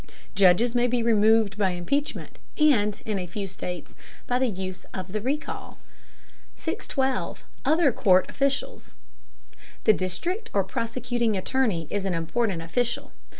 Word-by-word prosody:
Judges 200 +5 +5
may 245 0 +3
be 245 -1 +1
removed 220 -2 +4
by 195 -2 +3
impeachment, 230 +12 -2 0.2
and, 220 -10 +3
in 210 -3 -1
a 180 - -4
few 200 +4 -4
states, 180 -1 -6 0.3
by 245 0 +1
use 190 -7 -2
of 185 0 -5
the 215 +1 -2
Recall. 280 +5 -3 0.8
612. 265 -2 -2 0.2
OTHER 315 -3 +4
COURT 185 -4 +4
OFFICIALS. 275 - -2 0.9
The 215 - +6
district 340 - -3
or 200 - +3
prosecuting 230 +2 -1
attorney 195 - 0
is 200 -1 -1
an 185 -3 0
important 170 +2 -1
official. 235 +8 -1
215 Hz, 130 wpm, -26 LUFS, 185-250 Hz, 0.9 s, The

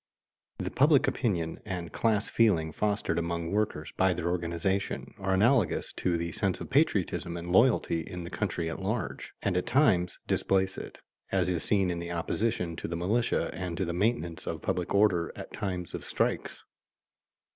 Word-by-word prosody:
The - - -3
"public 145 0 +4
opinion" 85 -10 -1
and 90 -4 -5
class 110 -3 +1
feeling 85 -9 +3
fostered 100 -2 0
among 85 0 -2
workers 100 -7 -1
by 95 -1 +3
their 85 0 -1
organization 90 +3 -1
are 95 0 +1
analogous 115 +2 +2
to 85 -2 +1
the 85 0 -3
sense - - -1
of - - -8
patriotism 85 0 +1
and 85 +1 -5
loyalty 100 -5 +4
in 90 +2 -7
the 85 - -7
country 85 -1 -2
at 80 - -4
large, 110 +4 -3
and - - +1
at 90 - 0
times 95 - +3
displace 95 0 +1
it, - - -8 0.3
as - - +2
is 85 -3 -1
seen 95 -4 +2
in 85 - -3
the 85 0 -5
opposition 85 0 -1
to - - -4
the 85 - -3
militia 110 +8 +1
and 90 -2 -4
to 95 - 0
the 85 - -2
maintenance 90 -3 -1
of - - -4
public 90 -1 -1
order 95 -5 +3
at - - -9
times 90 -3 -3
of - - -5
strikes. - - -1
90 Hz, 175 wpm, -29 LUFS, 85-105 Hz, 0.3 s, public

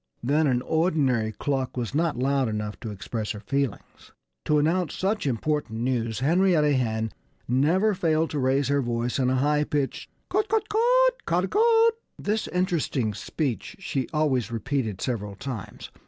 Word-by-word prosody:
Then 145 +5 +2
an 125 -2 +1
ordinary 145 -9 +1
cluck 135 +2 -2
was 120 0 -3
not 160 -3 +1
loud 135 -1 +1
enough 105 -1 -4
to 115 - -6
express 105 +2 -4
her 105 - -7
feelings. 135 0 -4 0.3
To 150 - +3
announce 165 +4 +1
such 195 -3 -1
important 125 -2 -1
news 120 -2 -1
Henrietta 160 -1 +3
Hen 110 -3 -1 0.4
never 165 - +3
failed 160 -3 +1
to 150 - -2
raise 135 +1 +2
her 140 0 +2
voice 120 +1 -1
in 130 -1 +2
a 130 - +2
high 150 +3 +2
pitched 145 -2 -2 0.2
"Cut 420 +1 0
cut 435 0 +1
cut, - - +3
ca 170 +2 +2
dah - - 0
cut!" 455 +1 +4 0.2
This 215 +1 -1
interesting 165 - 0
speech 115 - -3
she 135 -9 -3
always 135 -8 +1
repeated 115 -3 -2
several 105 -5 -3
times. 120 -2 -7
140 Hz, 160 wpm, -26 LUFS, 120-170 Hz, 0.4 s, cut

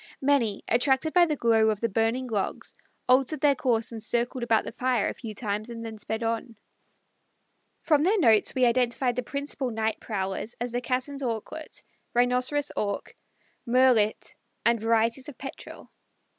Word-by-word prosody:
Many, 265 -7 +1
attracted 265 +5 +2
by 350 0 +5
the 305 - 0
glow 225 -4 +3
of 215 -2 -1
the 230 - 0
burning 225 +4 0
logs, 215 -5 -3 0.3
altered 265 +3 +3
their 290 -1 +5
course 240 -6 -1
and 225 -1 -6
circled 240 +3 -1
about 230 -2 +2
the - - -6
fire 250 -2 0
a - - -2
few 220 -3 -8
times 210 0 -3
and 230 -1 -7
then 220 -1 -7
sped 220 +2 -3
on. 230 +1 -3 1.3
From 300 -3 +3
their 385 +7 +3
notes 225 - +4
we 255 -1 +4
identified 245 +1 +1
the 250 - -1
principal 280 0 -4
night 220 -1 -2
prowlers 195 +1 -4
as 240 0 -3
the 245 +1 -2
Cassin's 260 +3 -3
Auklet, 250 +6 -5 0.3
Rhinoceros 250 +4 +1
Auk, 200 -1 -3 0.5
Murrelet, 240 -3 +3 0.3
and 235 -2 +3
varieties 230 +4 +1
of 280 - -12
Petrel. 275 - -9
240 Hz, 160 wpm, -26 LUFS, 225-265 Hz, 1.3 s, by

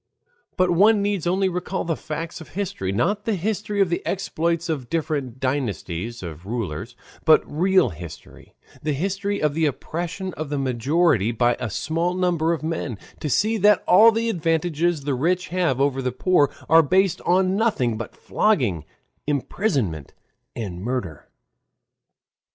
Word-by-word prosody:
But 185 -1 +3
one 205 +4 +5
need 200 -4 -1
only 190 +2 +2
recall 180 +1 -3
the 165 -1 0
facts 165 +2 -6
of 160 - -11
history, 195 - -2
not 200 - 0
the 225 - +1
history 205 +2 -1
of 190 - +3
the 170 - -1
exploits 170 -3 -1
of 140 -7 -3
different 145 -6 -2
dynasties 115 - -3
of 85 +1 -8
rulers, 110 -1 -4 0.3
but 160 -1 +6
real 185 -1 +2
history, 85 -2 -11 0.3
the 150 0 -1
history 195 +6 -2
of 150 -1 +1
the 160 0 +2
oppression 175 +6 -4
of 155 -2 -5
the 145 - -2
majority 130 - +2
by 120 +1 +2
a 125 -3 -3
small 165 - -1
number 175 -3 +1
of 165 -2 -2
men, 155 -8 -3 0.2
to 150 - -3
see 215 - +2
that 205 0 +4
all 220 +6 +8
the 225 +1 -1
advantages 165 -3 0
the 140 0 -1
rich 175 +8 0
have 170 -8 0
over 135 -1 +1
the 125 -1 -1
poor 145 +2 +3 0.2
are 165 +1 +7
based 185 +4 +2
on 185 +1 +2
nothing 200 - +1
but 110 0 -7
flogging, 120 - 0 0.4
imprisonment, 135 - -1 0.4
and 95 -6 -5
murder. 105 - -4
160 Hz, 155 wpm, -23 LUFS, 125-185 Hz, 0.4 s, all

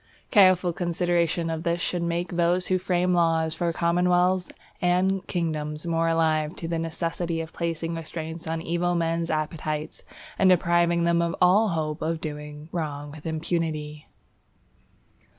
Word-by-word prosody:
Careful 185 -4 +5
consideration 170 -1 0
of 160 -1 -3
this 170 +1 0
should 175 +1 -1
make 170 +1 -1
those 175 +1 +1
who 185 0 +1
frame 180 0 +1
laws 165 -2 +2
for 170 +1 -1
commonwealths 180 +2 +2 0.3
and 185 +2 +1
kingdoms 155 -3 -2
more 165 -1 +1
alive 160 -1 +1
to 165 - -6
the 165 0 -1
necessity 165 +1 -2
of 160 -1 -6
placing 165 -1 -2
restraints 165 0 -6
on 165 0 -2 0.3
men's 165 0 0
evil 155 - +1
appetites, 155 0 -4 0.4
and 190 - +5
depriving 170 -1 +3
them 170 0 +3
of 170 0 -1
all 190 +5 +5
hope 155 -4 -2
of 160 +1 -1
doing 150 -1 -7
wrong 145 -4 -4
with 155 +1 -9
impunity. 155 -2 -3
165 Hz, 145 wpm, -25 LUFS, 160-175 Hz, 0.4 s, Careful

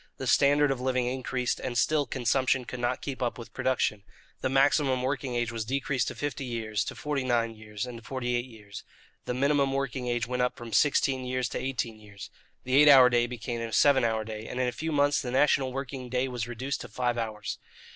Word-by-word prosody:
The 130 - -5
standard 145 +2 +4
of 130 -2 -2
living 130 -1 0
increased, 125 -1 -2
and 120 -2 -3
still 150 0 +2
consumption 130 +1 +1
could 125 - -7
not 120 +1 -1
keep 135 -2 -5
up 120 -1 -1
with 115 - -10
production. 130 -5 0 0.4
The - - 0
maximum 135 -1 +3
working 130 -1 -2
age 120 -1 0
was 115 -1 -3
decreased 135 +1 -1
to - - -4
fifty 145 -2 -3
years, 110 -4 -2
to - - -5
forty 145 -3 -2
nine 120 -2 +1
years, 110 -1 -6
and 120 -2 -8
to - - -19
forty 125 -1 -2
eight 120 0 -1
years. 105 -5 -11 0.4
The 125 - -2
minimum 140 0 +2
working 135 -2 -2
age 120 -1 0
went 125 +1 -2
up 125 - 0
from 115 -2 -8
sixteen 135 -1 +2
years 125 0 -1
to - - -3
eighteen 120 -4 -3
years. 100 -2 -11 0.3
The 130 +1 +2
eight 150 - +7
hour 130 -3 +8
day 120 0 +3
became 120 -1 -5
a 115 -1 -4
seven 135 +2 +4
hour 110 -1 +1
day, 110 0 -7
and 125 - -5
in 130 - +1
a - - 0
few 160 +5 -4
months 145 -1 +2
the 125 - -5
national 135 0 +3
working 130 -1 -5
day 130 +1 0
was 120 -3 -4
reduced 130 +4 -4
to - - -7
five 120 -1 -1
hours. 110 -2 -4
125 Hz, 225 wpm, -28 LUFS, 120-135 Hz, 0.4 s, hour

